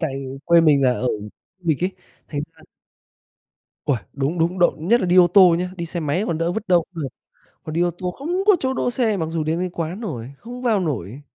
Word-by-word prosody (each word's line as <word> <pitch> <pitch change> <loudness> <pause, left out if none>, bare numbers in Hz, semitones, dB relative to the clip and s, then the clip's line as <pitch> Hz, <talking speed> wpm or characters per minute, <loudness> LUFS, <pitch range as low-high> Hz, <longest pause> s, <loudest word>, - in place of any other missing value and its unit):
tại 160 -4 -1 0.3
quê 170 +1 +6
mình 150 -4 +4
là 125 - +4
ở 125 - -2
khu 105 - -1 0.4
du 180 -2 -8
lịch 160 +2 +1
ấy, 185 - 0 0.4
thành 145 -2 -3
ra 160 -1 -21 1.2
Uầy, 140 -6 +1
đúng, 145 +5 -2
đúng, 170 +3 +1
đậu 175 - +4
nhất 215 +10 +2
là - - 0
đi 180 +1 +3
ô 180 - +8
tô 180 -1 +6
nhá. 180 +1 -2
Đi 170 -1 -4
xe 170 +1 -4
máy 160 +6 0
còn 165 -5 -1
đỡ, 170 +1 0
vứt 220 -1 -5
đâu 175 -2 +5
cũng 165 -3 -5
được, 135 - -2 0.6
còn 155 - -6
đi 170 - +1
ô 175 0 +2
tô 180 -1 -3
không 345 - -2
có 415 - +8
chỗ 260 0 0
đỗ 245 - -1
xe, 225 -5 +1
mặc 160 - -1
dù 165 -1 -2
đến 160 +3 -1
tới 185 - -1
quán 170 +3 -4
rồi, 130 - -5
không 245 - -9
vào 225 -5 +2
nổi, 135 - -3
170 Hz, 255 wpm, -22 LUFS, 155-190 Hz, 1.2 s, ô